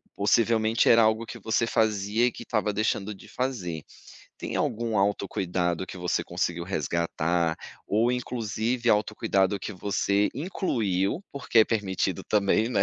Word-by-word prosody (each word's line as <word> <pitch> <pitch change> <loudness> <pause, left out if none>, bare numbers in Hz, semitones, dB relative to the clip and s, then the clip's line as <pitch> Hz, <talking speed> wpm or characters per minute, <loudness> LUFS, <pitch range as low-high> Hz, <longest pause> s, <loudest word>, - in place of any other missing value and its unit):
possivelmente, 110 +2 +2
era 115 0 +7
algo 110 +1 +2
que - - -9
você 115 +1 0
fazia 110 0 +1
e - - 0
que - - -9
estava 105 -3 0
deixando 105 0 -1
de 95 - -14
fazer. 95 - -3 0.5
Tem - - -4
algum 115 -1 -1
autocuidado 95 -3 0
que - - -9
você 90 0 -1
conseguiu 85 -1 -2
resgatar? 85 -1 0 0.3
Ou, 110 +4 +2
inclusive, 120 -1 -2
autocuidado 105 -2 +1
que 105 - -5
você 100 +1 +1
incluiu, 120 - -1
porque 135 -4 0
é - - +6
permitido 95 -5 -1
também, 105 +2 +2
né, 120 -5 +2
105 Hz, 140 wpm, -27 LUFS, 95-115 Hz, 0.5 s, era